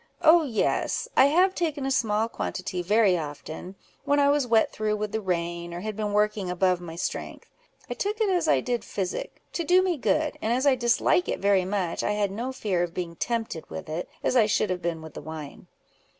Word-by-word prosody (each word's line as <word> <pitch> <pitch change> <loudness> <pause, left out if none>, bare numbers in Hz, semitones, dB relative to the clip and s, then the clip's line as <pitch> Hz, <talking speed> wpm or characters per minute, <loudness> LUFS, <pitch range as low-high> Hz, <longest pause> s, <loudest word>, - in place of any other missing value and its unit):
"Oh 330 +2 +7
yes! 250 -9 0
I - - +7
have 365 +6 +4
taken 310 -6 -2
a 270 - -1
small 220 -4 +1
quantity 185 -4 -4
very 205 +1 +3
often, 155 +4 -7 0.3
when 285 0 +2
I 280 0 +5
was 285 -3 +1
wet 225 -2 +3
through 215 0 -1
with 210 0 -3
the 220 +1 -2
rain, 170 -2 -3
or 175 - -5
had 215 +1 -4
been 210 -1 -2
working 210 -2 +1
above 180 0 +1
my 165 -2 -8
strength. 170 - -5 0.4
I - - -3
took 420 +2 -2
it 435 - +2
as 355 -4 +1
I - - +4
did 245 -3 -2
physic, 200 - -4
to 340 - -1
do 360 +3 +4
me 360 -3 0
good; 300 +3 0
and 220 - 0
as 255 +3 +1
I 280 - +6
dislike 245 +8 +2
it - - -1
very 195 -2 +2
much, 185 -3 -1
I 210 - 0
had 205 -2 0
no 235 +6 -3
fear 205 -9 -1
of 175 -1 -3
being 170 -2 -4
tempted 225 -6 -3
with 185 -1 -7
it, 160 +3 -4
as - - +1
I 225 -4 +5
should 210 -2 +1
have 180 -1 -2
been 165 -2 -3
with 160 - -11
wine." 155 -2 -9
210 Hz, 220 wpm, -26 LUFS, 180-265 Hz, 0.4 s, Oh